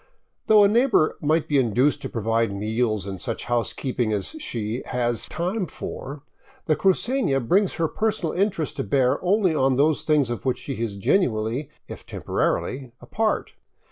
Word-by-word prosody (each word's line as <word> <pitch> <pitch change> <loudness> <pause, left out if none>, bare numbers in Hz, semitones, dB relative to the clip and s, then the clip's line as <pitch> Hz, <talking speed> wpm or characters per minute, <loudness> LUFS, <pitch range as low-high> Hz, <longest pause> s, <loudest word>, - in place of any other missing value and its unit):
Though 215 -1 +7
a - - +7
neigh 235 +6 +3
bor 155 -11 +3
might 155 +2 +1
be 145 -2 +3
induced 125 +4 +2
to - - -5
provide 115 -1 0
meals 110 0 -1
and 95 -2 -6
such - - -3
housekeeping 120 0 -1
as 105 -2 -2
she 115 - -3
has 120 -2 -1
time 185 +3 -2
for, 140 +1 -7 0.4
the 155 - +2
crucefia 195 - +1
brings 185 - +2
her 165 -1 +1
personal 215 -4 -1
interest 180 - -1
to - - -1
bear 130 - +1
only 190 -1 +2
on 135 -3 +2
those 145 +3 +2
things 145 -6 +2
of 120 - -4
which 130 -2 0
she 135 -5 -6
is 110 -4 -2
genuinely, 115 - 0 0.2
if - - -9
temporarily, 130 -2 -2
a - - -13
part. 220 -1 -1
135 Hz, 170 wpm, -24 LUFS, 115-180 Hz, 0.4 s, Though